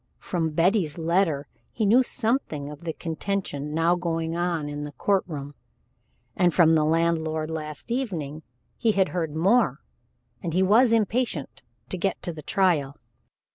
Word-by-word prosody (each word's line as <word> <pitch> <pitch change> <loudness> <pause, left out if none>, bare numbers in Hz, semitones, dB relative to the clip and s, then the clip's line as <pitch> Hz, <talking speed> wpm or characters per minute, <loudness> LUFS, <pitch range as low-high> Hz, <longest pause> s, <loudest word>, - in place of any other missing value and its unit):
From 165 -3 -2
Betty's 170 0 +1
letter 165 -3 +1 0.2
he 220 - -1
knew 230 +6 +6
something 225 - -1
of 150 +3 -11
the 160 - -2
contention 160 -4 -3
now 165 +2 +2
going 165 -2 -2
on 170 -3 -1
in 145 0 -5
the 145 0 -7
court 195 +8 +1
room, 145 -3 -6 0.8
and 180 -2 +3
from 165 -2 +6
the 155 -1 +4
landlord 160 0 0
last 155 +6 -6
evening 165 - -3 0.4
he 225 -2 +2
had 190 -2 +2
heard 165 -4 -3
more, 195 +10 +3 0.6
and 170 -3 -3
he 185 - +4
was 225 +6 +5
impatient 225 - 0 0.3
to 185 - -4
get 195 +1 0
to 175 - -3
the 155 - -8
trial. 155 -7 +1
170 Hz, 155 wpm, -25 LUFS, 155-195 Hz, 0.8 s, knew